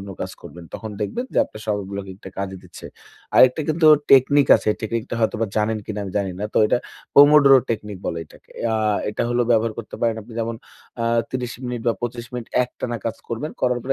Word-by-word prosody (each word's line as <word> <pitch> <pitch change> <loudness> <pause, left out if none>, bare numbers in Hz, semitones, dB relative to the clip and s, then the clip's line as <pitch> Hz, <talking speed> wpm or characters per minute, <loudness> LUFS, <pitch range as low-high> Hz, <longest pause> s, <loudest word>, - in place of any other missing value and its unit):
অন্য 100 0 -8
কাজ - - -5
করবেন। 85 0 -11
তখন 110 - -6
দেখবেন 235 - -2
যে, - - +3
আপনার 110 - -12
সময় 105 -2 -1
ব্লকিংটা 95 -1 -7
কাজে 95 -1 -4
দিচ্ছে। - - -11 0.5
আরেকটা 130 +4 +6
কিন্তু 155 +1 +2 0.2
টেকনিক 140 +1 +6
আছে। - - -4
টেকনিকটা 115 +1 -3
হয়তোবা 110 0 +1
জানেন 110 +1 +1
কিনা 105 -1 -4
আমি 95 - -7
জানি 95 -2 -2
না। - - -2
তো - - +4
এটা 120 - +2 0.4
পোমোডরো 145 -1 +8
টেকনিক 105 -3 -3
বলে 85 - -2
এটাকে। - - -20 0.2
আ - - +1 0.4
এটা - - -2
হল 120 - 0
ব্যবহার 115 -1 +3
করতে 115 - -7
পারেন 115 -1 +1
আপনি, 115 - -14
যেমন 115 0 -3 0.5
আ - - 0 0.3
৩০ 125 -1 -3
মিনিট 125 -1 -3
বা 115 - +3
২৫ 120 0 -4
মিনিট 120 -2 -5 0.2
একটানা 125 -1 -5
কাজ 115 - -2
করবেন। 115 +7 -4
করার 125 -1 +1
পরে 135 +2 0
115 Hz, 205 wpm, -22 LUFS, 105-125 Hz, 0.5 s, পোমোডরো